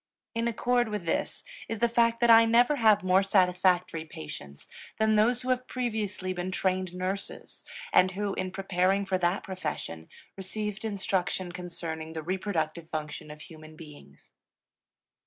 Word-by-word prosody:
In 230 0 0
accord 240 +1 +1
with 210 -4 -4
this 165 - -2 0.3
is 225 - -2
the 235 +3 +3
fact 230 0 +2
that 240 -1 +6
I 225 0 +9
never 240 +5 +4
have 215 -4 +5
more 185 +1 +4
satisfactory 180 -3 +2
patients 75 - -9 0.3
than 220 0 +3
those 235 +4 +3
who 255 - -4
have 255 0 0
previously 215 -7 -2
been 180 0 -3
trained 185 -1 -1
nurses 185 +2 -5 0.3
and 185 - +6
who, 200 +1 -2
in 185 - -2
preparing 190 +1 +1
for 190 -1 0
that 175 +2 +1
profession, 85 - -5 0.3
received 210 +2 -4
instruction 190 -3 -1
concerning 165 -3 -6
the 160 -1 -5
reproductive 170 -3 -2
function 150 -1 -5
of 150 0 -10
human 155 -2 -12
beings. 145 - -14
185 Hz, 150 wpm, -28 LUFS, 175-215 Hz, 0.3 s, I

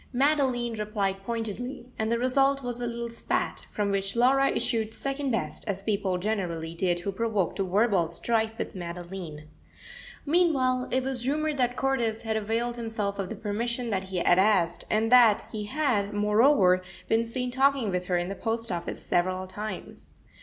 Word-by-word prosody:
Madeline 260 -3 +2
replied 205 -3 -2
pointedly, 235 +4 -4
and 220 +1 0
the 235 - +2
result 270 +3 +2
was 245 -1 -3
a 240 - -1
little 235 0 -4
spat, 230 - -2
from 205 -1 -1
which 195 +1 -1
Laura 270 +3 +4
issued 225 -2 -1
second 275 0 -2
best, 230 - -2
as 195 -1 -3
people 200 -3 0
generally 175 -5 -2
did 175 0 0
who 200 - -2
provoked 210 -3 -1
a - - +2
verbal 195 -2 +2
strife 220 +5 0
with - - -4
Madeline. 175 -3 -7 0.8
Meanwhile 280 -6 +2
it 260 +1 +1
was 260 -2 -2
rumoured 305 +1 0
that 245 -1 +1
Cordis 235 -5 0
had 220 -1 -1
availed 230 +3 -1
himself 220 -4 -3
of 190 -2 -2
the - - -5
permission 235 +3 -2
that 190 -1 -1
he 190 -1 -4
had 175 +1 +4
asked, 190 -4 +2
and 220 +2 +1
that 235 -4 +6
he 210 -1 -4
had, 210 -6 0
moreover, 210 -2 +4 0.3
been 225 +1 +3
seen 250 +2 -3
talking 265 -4 +2
with 180 0 -1
her 180 - +1
in 175 0 -1
the 195 - -3
post 225 +1 -2
office 170 -1 -4
several 185 +1 0
times. 210 +3 -7
220 Hz, 175 wpm, -27 LUFS, 195-245 Hz, 0.8 s, that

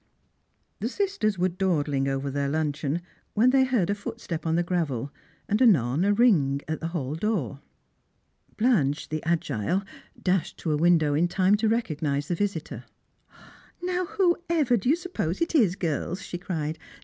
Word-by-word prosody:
The 220 +4 -2
sisters 375 - -1
were 180 +1 +2
dawdling 155 -7 0
over 135 0 -2
their 140 0 -1
luncheon, 155 +1 -1 0.3
when 240 +4 +5
they 265 0 +5
heard 245 -9 +1
a - - +2
footstep 170 -5 -5
on 160 - +2
the 175 - +2
gravel, 150 -7 -2 0.3
and 210 +3 +1
anon 155 - +4
a 200 - +3
ring 185 - +3
at 155 0 -2
the 165 - -3
hall 150 -5 -3
door. 160 - -2 1.0
Blanche, 170 - +1
the 155 0 -3
agile, 160 - 0 0.4
dashed 185 -2 0
to 160 - -2
a - - +2
window 160 -2 +3
in 165 +4 +2
time 185 +2 +2
to 215 +1 +1
recognise 150 -10 -1
the - - +1
visitor. 175 -3 -3 1.0
"Now, 365 0 0
whoever 345 - +1
do 230 +2 0
you 300 - +5
suppose 345 - -3
it 335 - -1
is, 215 - +4
girls?" 175 +2 -2
she 175 -2 -6
cried. 160 -3 -3
175 Hz, 160 wpm, -26 LUFS, 150-220 Hz, 1.0 s, when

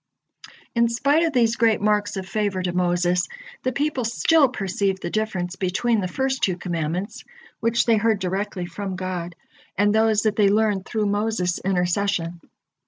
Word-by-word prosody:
In 235 -1 +3
spite 280 +7 +2
of 325 - 0
these 235 -4 +2
great 225 -2 +3
marks 210 0 +1
of 190 -1 -5
favor 195 -2 -1
to 180 -1 -2
Moses, 175 0 +1 0.3
the 255 - -1
people 280 0 -1
still 275 +5 +3
perceived 195 -3 -2
the - - -3
difference 190 -5 -2
between 205 +4 0
the 185 - -1
first 265 +7 -1
two 185 -2 +1
commandments, 175 +3 -3 0.4
which 230 +1 +1
they 230 -2 +4
heard 220 0 +2
directly 190 0 -3
from 190 +2 -5
God, 180 -2 -4 0.4
and 205 +1 +3
those 220 -1 +3
that 215 -2 0
they 205 -2 +5
learned 205 -2 +1
through 220 -2 -1
Moses' 205 -3 0
intercession. 180 -2 -1
205 Hz, 165 wpm, -23 LUFS, 180-225 Hz, 0.4 s, they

